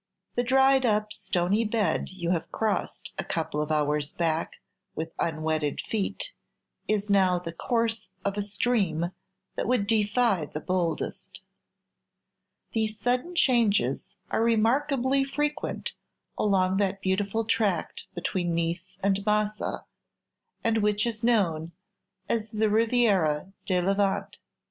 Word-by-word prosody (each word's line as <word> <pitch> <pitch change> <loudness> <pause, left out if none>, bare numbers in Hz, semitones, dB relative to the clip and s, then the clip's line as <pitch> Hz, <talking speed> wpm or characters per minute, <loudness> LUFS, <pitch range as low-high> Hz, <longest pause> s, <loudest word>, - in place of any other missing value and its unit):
The 245 - +1
dried 265 +2 +4
up 210 -2 +1
stony 185 +5 0
bed 210 -6 0
you 175 -2 -3
have 170 -3 -1
crossed 220 -2 -2
a - - 0
couple 160 -2 -2
of 150 +1 -2
hours 150 -1 +1
back 165 -1 0 0.4
with 160 +1 -4
unwetted 155 -2 0
feet 225 - -2 0.5
is 210 -1 0
now 190 -3 +4
the 170 -2 -6
course 225 +3 -1 0.2
of 200 0 0
a 205 - -1
stream 200 -5 0 0.4
that - - -2
would 245 -4 +2
defy 210 -5 +2
the 150 - -5
boldest. 175 -2 -2 1.3
These 220 -1 -1
sudden 250 - 0
changes 215 - +3 0.3
are - - +1
remarkably 260 +4 +2
frequent 295 +2 -2 0.4
along 190 -2 +2
that 195 -1 0
beautiful 200 +4 0
tract 205 -6 0
between 175 -1 -1
Nice 170 +2 -2
and 195 0 +2
Massa, 210 0 0 0.8
and 225 -1 +2
which 210 0 +2
is 230 -2 -3
known 170 -9 +1 0.5
as 220 -1 -1
the 215 -1 +1
"Riviera 205 -8 +2
di 185 -2 +2
Levante." 195 +2 0
205 Hz, 125 wpm, -27 LUFS, 175-225 Hz, 1.3 s, dried